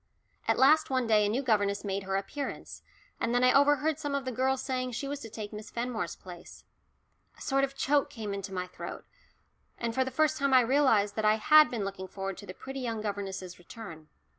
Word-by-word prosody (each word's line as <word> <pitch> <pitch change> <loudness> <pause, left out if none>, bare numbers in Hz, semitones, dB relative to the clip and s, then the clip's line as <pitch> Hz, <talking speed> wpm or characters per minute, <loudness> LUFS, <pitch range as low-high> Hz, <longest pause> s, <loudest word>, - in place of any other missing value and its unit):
At - - +3
last 305 +4 +5
one 260 -2 +1
day 215 -2 +4
a - - 0
new 250 +6 -1
governess 205 -4 +1
made 195 -1 -2
her 190 0 -1
appearance, 235 +9 -5 0.4
and 235 - 0
then 245 - +3
I 255 - +5
overheard 290 +2 +3
some 290 -2 -2
of 275 -1 -2
the 255 - -2
girls 260 +2 0
saying 255 -1 -2
she 275 +4 -3
was 285 0 -4
to 225 - -9
take 215 -1 -7
Miss 210 +1 -8
Fenmore's 235 -7 -3
place. 180 -2 -12 0.7
A - - -17
sort 275 0 +1
of 275 0 -1
choke 280 +1 +2
came 215 -3 -5
into 195 0 -5
my 180 -1 -3
throat, 180 - -8 0.7
and 230 -1 -2
for 260 - +2
the 260 - -4
first 310 +3 +1
time 275 -1 +3
I 255 - +8
realised 230 -6 +3
that 220 - 0
I 215 0 +5
had 305 +7 +6
been 220 -5 -3
looking 195 -1 -5
forward 195 0 -5
to - - -11
the 185 - -8
pretty 270 +1 -7
young 230 -3 -3
governess's 195 -4 -5
return. 175 -4 -10
230 Hz, 220 wpm, -29 LUFS, 200-270 Hz, 0.7 s, I